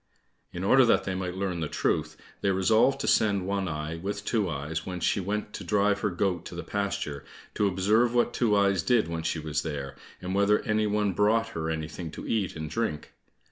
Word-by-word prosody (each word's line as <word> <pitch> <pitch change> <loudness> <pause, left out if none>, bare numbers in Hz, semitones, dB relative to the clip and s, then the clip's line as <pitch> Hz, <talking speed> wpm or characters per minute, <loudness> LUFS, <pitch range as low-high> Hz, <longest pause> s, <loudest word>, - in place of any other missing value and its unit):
In 90 - -5
order 130 +7 +6
that 115 - +3
they 95 - -2
might 95 -1 -3
learn 95 -3 -2
the 80 - -1
truth, - - -1 0.2
they 100 - +1
resolved 110 +8 +3
to - - -2
send 100 -4 +3
One 100 0 -1
eye 75 0 -4
with 100 +4 -4
Two 105 -6 +1
eyes 75 +1 -3
when 90 -1 -5
she 95 - +1
went 105 +2 -3
to - - -6
drive 105 -1 +2
her 105 - 0
goat 90 -2 -1
to - - -8
the 85 - -5
pasture, 100 -8 -3 0.3
to 105 - +2
observe 105 +6 +2
what 120 0 +2
Two 110 -4 +2
eyes 100 -3 +3
did 120 +1 +2
when 85 -1 -3
she 80 - -1
was 75 -1 -2
there, 70 -4 -5 0.2
and 90 +1 -4
whether 100 +1 +4
any 110 0 +1
one 105 -1 +1
brought 110 +4 +2
her 80 -6 -3
anything 80 +1 -4
to - - -7
eat 105 -5 -1
and 80 -1 -5
drink. 75 -3 -3
95 Hz, 215 wpm, -27 LUFS, 85-105 Hz, 0.3 s, order